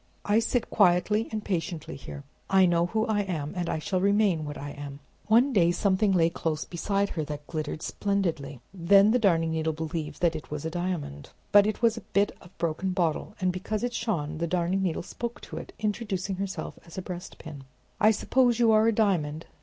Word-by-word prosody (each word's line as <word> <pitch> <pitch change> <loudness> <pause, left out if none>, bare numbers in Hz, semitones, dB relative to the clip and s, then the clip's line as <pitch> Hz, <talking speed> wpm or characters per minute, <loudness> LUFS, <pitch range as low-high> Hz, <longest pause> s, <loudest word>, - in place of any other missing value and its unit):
I 210 +2 +4
sit 235 +1 -1
quietly 205 +3 +3
and 215 -1 -4
patiently 170 -3 -3
here. 140 +1 -9 0.3
I 190 -1 +5
know 170 -1 +2
who 220 +4 0
I 220 -3 0
am, 160 -7 -3
and 175 -2 -2
I - - 0
shall 180 +4 -1
remain 200 -5 +2
what 145 0 -6
I 145 0 -6
am." 140 -1 -8 0.3
One 240 +5 +4
day 175 -6 +4
something 195 +3 +2
lay 170 -3 +3
close 160 -2 -2
beside 200 +3 -1
her 160 - -3
that 145 0 -6
glittered 155 -1 -4
splendidly; 165 - -2
then 195 +3 +5
the 250 - +3
Darning 165 -6 +2
Needle 160 0 0
believed 155 -1 -4
that 170 -2 +3
it 155 - -7
was 150 0 -5
a 160 - -2
diamond; 175 - -4 0.2
but 205 0 +7
it 215 +3 -3
was 230 -1 +4
a - - -5
bit 200 +1 +2
of 175 - -14
broken 170 +3 -1
bottle; 170 -4 -1
and 185 -1 +1
because 200 +5 -3
it 245 0 -1
shone, 165 -10 -2
the 170 - -1
Darning 180 +2 0
Needle 180 -4 -1
spoke 235 +5 -6
to - - -8
it, - - -7
introducing 205 -3 -2
herself 195 0 -5
as 170 - -13
a 190 - -3
breastpin. 160 -5 -8 0.3
"I 215 - +6
suppose 240 +2 +2
you 235 -2 +4
are 215 +1 +5
a - - +5
diamond?" 170 -8 0
180 Hz, 205 wpm, -27 LUFS, 160-205 Hz, 0.3 s, but